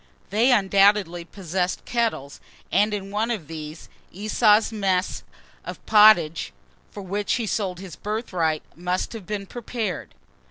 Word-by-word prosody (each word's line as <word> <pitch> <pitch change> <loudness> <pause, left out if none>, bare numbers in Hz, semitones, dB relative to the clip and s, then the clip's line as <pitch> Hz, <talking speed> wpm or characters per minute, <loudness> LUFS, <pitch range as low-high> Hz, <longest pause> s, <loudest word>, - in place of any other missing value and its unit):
They 230 +6 +3
undoubtedly 195 -4 +3
possessed 180 0 -3
kettles; 225 - -2 0.3
and 210 +1 +3
in 200 -1 -4
one 215 +3 -1
of 215 -9 -3
these, 155 0 -8 0.2
Esau's 215 +2 +3
mess 195 -4 -1 0.4
of - - -9
pottage, 210 -7 +5 0.4
for 200 - -9
which 200 +2 -2
he 235 - -2
sold 195 -4 -2
his 190 -3 -9
birthright, 185 -8 -2
must 180 +5 -2
have 220 -5 -9
been 205 -2 -4
prepared. 220 -5 -5
200 Hz, 130 wpm, -24 LUFS, 180-215 Hz, 0.4 s, pottage